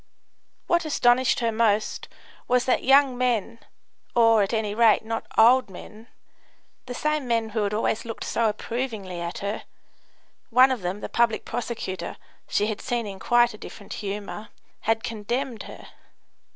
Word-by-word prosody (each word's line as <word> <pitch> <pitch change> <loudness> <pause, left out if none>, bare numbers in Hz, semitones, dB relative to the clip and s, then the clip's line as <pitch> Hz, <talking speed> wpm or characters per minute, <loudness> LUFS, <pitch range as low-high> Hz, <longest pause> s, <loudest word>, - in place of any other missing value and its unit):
What 345 0 +2
astonished 245 -5 +3
her 230 -1 +1
most 220 -1 0 0.4
was 250 0 +2
that 255 - +1
young 270 0 +5
men 230 -2 0 0.6
or, 230 -2 +5
at 195 - 0
any 220 -3 -1
rate, 220 -1 +4
not 225 0 -4
old 245 +1 +6
men 215 +4 -12 0.8
the 245 - -5
same 305 -2 -1
men 230 -2 0
who 210 -2 -1
always 215 +1 -1
looked 225 -1 -6
so 230 -1 +1
approvingly 215 -5 -4
at 170 0 -4
her 205 +2 -3 0.9
(one 255 +2 +6
of 250 -5 -2
them, 180 +3 -3
the - - -4
public 235 -2 +1
prosecutor, 225 -7 -4 0.3
she 205 - +1
had 215 -1 -3
seen 240 -3 -2
in 195 -2 -7
quite 240 +2 +3
a 215 - -12
different 200 - -9
humour) 205 +1 -6 0.3
had 225 +1 0
condemned 235 +2 -3
her. - - -12
225 Hz, 150 wpm, -25 LUFS, 210-245 Hz, 0.9 s, old